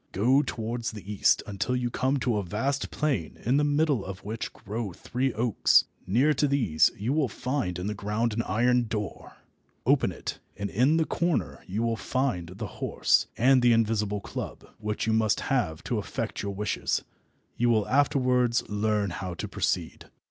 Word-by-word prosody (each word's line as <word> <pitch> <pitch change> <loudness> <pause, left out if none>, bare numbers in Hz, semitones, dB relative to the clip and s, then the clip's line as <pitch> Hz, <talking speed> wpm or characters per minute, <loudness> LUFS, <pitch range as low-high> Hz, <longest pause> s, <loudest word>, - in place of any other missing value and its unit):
Go 125 +8 +4
towards 120 -2 -3
the 105 -1 -7
east 100 - +3
until 105 +5 -2
you 125 -1 -1
come 130 +3 +1
to 120 -4 +1
a 100 - -1
vast 125 +10 -1
plain 135 - -1
in 125 +4 +3
the 150 - +3
middle 145 -5 +2
of 95 0 -7
which 110 +2 -4
grow 105 -1 -5
three 130 +8 -2
oaks. 115 -1 +4 0.2
Near 130 +11 +3
to 145 +1 +2
these 115 - +3
you 115 +7 -1
will 150 -3 +2
find 125 -5 -2
in 90 - -4
the 105 - -1
ground 105 +3 -1
an 115 - 0
iron 125 +2 +2
door. 105 -4 -5 0.5
Open - - +3
it, - - -6 0.2
and 100 0 -3
in 135 +9 +3
a 160 - +2
corner 170 0 -1
you 105 +5 -2
will 115 -1 0
find 100 -6 -1
the - - -4 0.2
horse - - +2
and 130 +2 +5
the 120 -1 +5
invisible 105 -2 +1
club, - - -6
which 105 0 -2
you 110 - +1
must 110 -2 +2
have 100 - -1
to - - -1
effect - - -4
your 100 -1 -4
wishes. 105 0 -1 0.5
You 120 0 +2
will 110 -3 +2
afterwards 130 -4 +2
learn 105 -1 0
how 90 0 -5
to - - -4
proceed." - - -2
115 Hz, 180 wpm, -27 LUFS, 105-130 Hz, 0.5 s, and